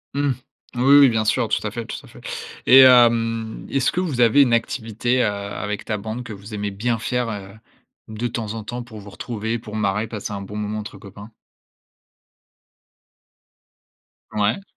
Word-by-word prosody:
Mmh. 140 0 +1 0.4
Oui, 130 +3 +5
oui, 140 -3 +8
bien 110 -1 0
sûr, - - +1
tout - - -1
à - - -4
fait, - - -5
tout - - -6
à - - -15
fait, - - -15 0.5
et 130 - +9
hem, 115 -3 +4
est-ce 135 -2 +1
que 180 - -2
vous 150 -10 -1
avez 120 +4 +6
une 120 -3 +1
activité, 115 +1 0
heu, - - +2
avec 100 0 -4
ta 105 - -2
bande 110 +4 -5
que 115 - -8
vous 100 +2 -11
aimez 105 0 -2
bien 115 +4 -1
faire, 125 0 -1
heu, 100 -3 -6 0.6
de 110 +2 -3
temps 110 -3 -4
en 110 - -5
temps 120 +3 -5
pour 110 -3 -11
vous 100 0 -11
retrouver, 115 0 -4
pour 110 -2 -9
marrer, 105 0 0
passer 105 -2 -6
un 100 - -5
bon 100 +1 -8
moment 105 0 -3
entre 105 -1 -8
copains? 100 +3 -12 3.0
Ouais. 105 - 0
110 Hz, 185 wpm, -22 LUFS, 105-120 Hz, 3.0 s, et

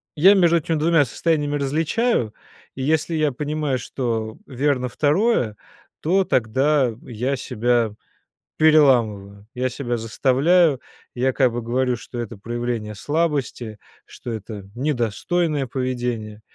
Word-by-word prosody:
я 185 +7 +7
между 170 -3 +4
этими 165 +1 -1
2 160 -1 +4
состояниями 145 +2 0
различаю, 150 - 0 0.4
и 130 - -4
если 160 +3 +1
я 155 -2 +1
понимаю, 145 -1 -2
что 115 -4 -3
верно 135 -1 0
2, 150 - +1 0.5
то 190 +5 +2
тогда 130 0 +1
я 125 +4 -2
себя 120 -2 0 0.7
переламываю, 115 -10 +3
я 130 +1 -1
себя 120 -1 -3
заставляю, 135 +7 +2 0.3
я 130 +2 +1
как 130 -3 +3
бы 120 - -3
говорю, 125 +2 0
что 120 +1 -8
это 115 -2 -5
проявление 120 -1 -4
слабости, 140 -5 -2 0.3
что 120 - -8
это 105 -2 -8
недостойное 145 +4 -1
поведение. 120 -4 -3
130 Hz, 120 wpm, -22 LUFS, 120-150 Hz, 0.7 s, я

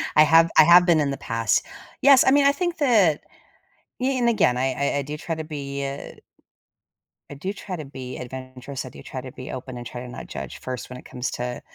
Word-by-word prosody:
I 155 - +8
have 165 +2 +5
I - - +10
have 175 +2 +7
been 170 -3 +4
in 145 -2 +1
the 135 - -4
past. 115 -2 0 0.4
Yes, 275 -2 +7
I - - +5
mean, 280 0 +5
think 350 +2 -2
that 210 - +3 0.8
i - - -1
in 265 0 +1
and 240 - +3
again, 205 - +3
I 130 +2 0
I - - -1
do 145 +2 -6
try 165 +2 -4
to 160 - -5
be, 140 -2 -5
uh 135 +1 -8 1.1
I - - -7
do 185 +8 -4
try 195 -2 -6
to 155 -3 -7
be 130 -2 -8
adventurous, 130 +1 -7
I - - -7
do - - -13
try 130 - -6
to 130 0 -9
be 130 +3 -9
open 130 0 -7
and 120 - -8
try 120 +1 -7
to 125 - -8
not 95 - -9
judge 70 -2 -7
first 130 -2 -6
when 125 - -8
it - - -14
comes 125 0 -4
to 125 0 -4
140 Hz, 235 wpm, -24 LUFS, 130-175 Hz, 1.1 s, I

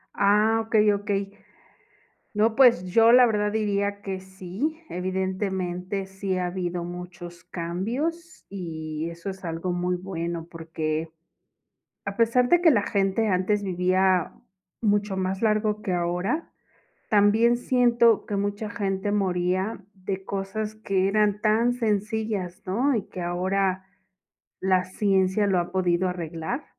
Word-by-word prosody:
Ah, 210 +3 +3
okey, 215 -1 +4
okey. 200 -1 -2 1.1
No 220 +2 +2
pues, 245 -8 +5
yo 225 +5 +5
la 250 +1 +8
verdad 210 -2 +1
diría 200 -1 -1
que 190 -2 -5
sí, 190 - -4
evidentemente 185 0 -2
sí 195 0 -3
ha 180 - -1
habido 175 -1 -3
muchos 175 0 -9
cambios 250 - -4
y 160 -4 -5
eso 170 +3 -7
es 190 0 -8
algo 170 +1 -3
muy 180 0 -1
bueno, 170 -2 -4
porque, 160 -1 -3 0.9
a 195 0 -5
pesar 235 +2 +3
de 350 0 +5
que 335 -2 +6
la 220 -7 +3
gente 200 +1 0
antes 195 +2 +1
vivía 185 -1 +1 0.5
mucho 205 -2 +1
más 190 +2 -2
largo 215 -1 +1
que 190 - -1
ahora, 180 - -1 0.6
también 220 +3 +4
siento 240 -3 +3
que 205 - -3
mucha 205 +2 -2
gente 200 -3 -2
moría 185 +1 0
de 190 0 -5
cosas 200 +3 -4
que 195 -3 0
eran 210 0 +1
tan 225 +3 +3
sencillas, 210 -4 -2
¿no? 245 +9 +1
Y 215 - -1
que 185 - -7
ahora 185 +2 0 0.8
la 185 -1 +2
ciencia 190 +1 +1
lo 190 -2 +2
ha 175 - -3
podido 185 -1 +1
arreglar. 170 - -4
195 Hz, 130 wpm, -25 LUFS, 180-215 Hz, 1.1 s, la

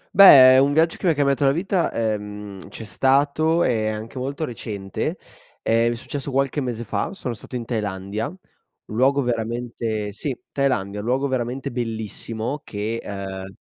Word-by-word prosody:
Beh, 130 -9 +10
un 140 +1 +3
viaggio 165 +2 +3
che 185 - -2
mi 160 - +4
cambiato 140 -1 +2
la 135 - +5
vita, 180 +4 0
ehm, 105 -3 -4
c'è - - -8
stato 145 +8 +2
e 110 -3 +1
anche 110 +4 -5
molto 140 +4 -3
recente. 105 -6 -4 0.4
È 115 +1 +2
successo 140 +4 -6
qualche 135 +2 0
mese 120 -3 -3
fa, 105 - -2
sono 125 -10 -4
stato 115 +3 -9
in 120 - -3
Thailandia, 105 -2 -3
un 180 - -14
luogo 135 +4 +3
veramente 115 -3 -2
sì, 125 +5 -4
Thailandia. 110 -8 0
Un 105 - -5
luogo 130 +3 +1
veramente 130 0 -2
bellissimo 115 +2 -4
che, 110 +2 -4
uhm 95 -1 -6
120 Hz, 155 wpm, -23 LUFS, 110-140 Hz, 0.4 s, Beh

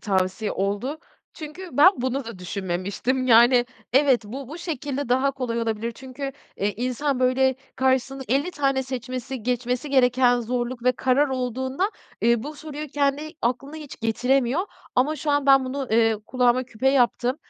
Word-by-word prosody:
tavsiye 190 +1 -1
oldu. 205 +10 -2 0.4
Çünkü 320 +4 -8
ben 295 +6 +9
bunu 260 +1 -2
da 230 -4 -8
düşünmemiştim, 190 +7 -2
yani 240 +1 +6 0.3
evet, 265 -2 +4
bu 260 +5 -7
bu 315 - -8
şekilde 285 -5 -4
daha 260 +3 +3
kolay 250 -4 -3
olabilir. 230 +1 -2
Çünkü 265 +2 -6 0.2
e, 200 +1 0
insan 255 +4 -2
böyle 260 +1 +3 0.2
karşısında 265 +1 0
50 280 +8 +1
tane 275 -4 0
seçmesi, 255 -1 -5
geçmesi 250 +3 -2
gereken 250 -2 +4
zorluk 240 +1 -3
ve 250 - +4
karar 260 +3 +2
olduğunda, 260 - -2 0.3
eee, 235 -1 +3
bu 300 +4 -6
soruyu 300 0 -7
kendi 285 +2 0
aklına 275 +5 -2
hiç 300 -3 -10
getiremiyor 250 +5 +1 0.3
ama 285 +5 +2
şu 305 -1 -2
an 285 -1 +1
ben 270 -1 +6
bunu, 265 +1 -3
eee, 225 0 +3
kulağıma 250 0 +2
küpe 250 +2 -1
yaptım 255 0 +2
255 Hz, 155 wpm, -24 LUFS, 240-275 Hz, 0.4 s, ben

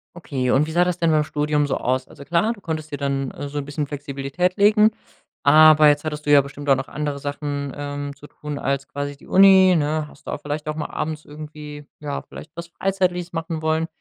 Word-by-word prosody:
Okay. 135 -7 -3
Und 145 +3 +3
wie 160 - -6
sah 175 +2 +3
das 180 -1 -1
denn 165 -2 +2
beim 155 -1 +3
Studium 150 0 0
so 135 - -1
aus? 130 +1 -1
Also, 140 -2 -13
klar, 175 +8 +1
du 200 - -17
konntest 155 -2 -5
dir 145 - -3
dann, 135 -1 -2
äh, 145 - -6
so 145 +1 -4
'n 140 - -5
bisschen 145 +1 -3
Flexibilität 145 +5 -3
legen, 210 +1 +5 0.5
aber 155 +1 +7
jetzt 145 0 +3
hattest 150 -1 -5
du 145 - +1
ja 145 - +8
bestimmt 140 +1 -9
auch 135 - +7
noch 135 0 -4
andere 145 -1 -4
Sachen, 145 0 -4
ähm, 145 0 -5
zu 145 +1 -14
tun 150 -1 -7
als 140 0 -2
quasi 145 0 -5
die - - -18
Uni, 190 -1 +7
ne? 155 0 0
Hast - - -19
du - - -5
auch - - -5
vielleicht 150 +1 -4
auch 155 - -2
mal 155 - -3
abends 155 0 -4
irgendwie 150 -1 -9
ja, 145 -1 -4
vielleicht 155 - -12
was 170 0 -7
Freizeitliches 180 -1 -1
machen 165 -1 -3
wollen 160 +1 0
150 Hz, 230 wpm, -22 LUFS, 145-160 Hz, 0.5 s, ja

